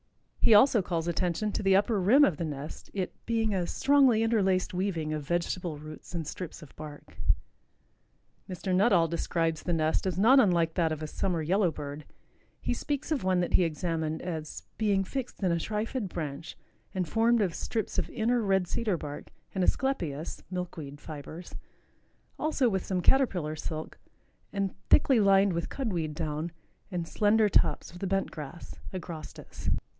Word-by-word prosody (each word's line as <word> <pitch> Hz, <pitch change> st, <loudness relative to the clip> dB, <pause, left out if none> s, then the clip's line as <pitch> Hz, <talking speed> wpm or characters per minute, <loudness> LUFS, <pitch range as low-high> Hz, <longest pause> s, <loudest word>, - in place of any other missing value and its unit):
He 220 Hz, -, +6 dB
also 225 Hz, 0 st, +6 dB
calls 170 Hz, -2 st, -2 dB
attention 180 Hz, +4 st, 0 dB
to -, -, -2 dB
the 195 Hz, -1 st, +4 dB
upper 205 Hz, +1 st, +2 dB
rim 260 Hz, +11 st, +6 dB
of 170 Hz, -, 0 dB
the -, -, -2 dB
nest, 150 Hz, -1 st, -6 dB
it 185 Hz, -2 st, -2 dB
"being 225 Hz, -2 st, +1 dB
a 180 Hz, -3 st, 0 dB
strongly 270 Hz, -6 st, +4 dB
interlaced 195 Hz, -6 st, +2 dB
weaving 175 Hz, -5 st, -1 dB
of 155 Hz, -, -2 dB
vegetable 175 Hz, -1 st, -1 dB
roots 155 Hz, +3 st, -10 dB
and 165 Hz, -2 st, -2 dB
strips 165 Hz, +2 st, -7 dB
of 150 Hz, -, -15 dB
bark." 150 Hz, -1 st, -10 dB, 1.3 s
Mr. 185 Hz, +1 st, -3 dB
Nuttall 185 Hz, -3 st, +4 dB
describes 165 Hz, -1 st, -1 dB
the 175 Hz, -, -2 dB
nest 160 Hz, +3 st, +1 dB
as 180 Hz, -2 st, -1 dB
not 240 Hz, +8 st, +7 dB
unlike 170 Hz, -8 st, +3 dB
that 165 Hz, -2 st, +1 dB
of 155 Hz, 0 st, -3 dB
a -, -, -3 dB
summer 170 Hz, 0 st, -1 dB
yellow 185 Hz, +3 st, +3 dB
bird. 145 Hz, -1 st, -7 dB, 0.5 s
He -, -, -1 dB
speaks 290 Hz, +1 st, -3 dB
of 295 Hz, -8 st, 0 dB
one 185 Hz, -1 st, +2 dB
that 175 Hz, -, -2 dB
he 185 Hz, -, +6 dB
examined 160 Hz, -1 st, -2 dB
as 160 Hz, -4 st, -5 dB, 0.2 s
"being 200 Hz, -3 st, +2 dB
fixed 255 Hz, 0 st, -5 dB
in 185 Hz, -, +3 dB
a 170 Hz, -, +2 dB
trifid 215 Hz, +3 st, -2 dB
branch 155 Hz, -2 st, -5 dB, 0.4 s
and 185 Hz, -2 st, 0 dB
formed 230 Hz, +6 st, +3 dB
of 190 Hz, -5 st, +1 dB
strips 220 Hz, -3 st, -2 dB
of -, -, -1 dB
inner 235 Hz, +2 st, +1 dB
red 190 Hz, -3 st, +2 dB
cedar 210 Hz, -3 st, 0 dB
bark 145 Hz, -2 st, -7 dB, 0.3 s
and 190 Hz, -, 0 dB
asclepias 170 Hz, -, -1 dB
(milkweed) 165 Hz, -6 st, -5 dB
fibers, 155 Hz, +3 st, -9 dB, 0.9 s
also 300 Hz, -4 st, +2 dB
with 190 Hz, -4 st, 0 dB
some 185 Hz, -2 st, -1 dB
caterpillar 180 Hz, -, +2 dB
silk, 155 Hz, 0 st, -6 dB, 0.5 s
and 195 Hz, -2 st, -1 dB, 0.2 s
thickly 265 Hz, -4 st, +5 dB
lined 195 Hz, -1 st, +5 dB
with 170 Hz, 0 st, -2 dB
cud 250 Hz, -7 st, -2 dB
weed 155 Hz, -3 st, -2 dB
down 155 Hz, +1 st, -3 dB, 0.4 s
and 175 Hz, -4 st, -3 dB
slender 215 Hz, +2 st, +3 dB
tops 200 Hz, -, +2 dB
of 175 Hz, -, -11 dB
the 195 Hz, -, -2 dB
bent 195 Hz, +1 st, 0 dB
grass 155 Hz, +2 st, -8 dB, 0.2 s
(Agrostis.)" 170 Hz, -5 st, -6 dB
180 Hz, 170 wpm, -29 LUFS, 160-210 Hz, 1.3 s, not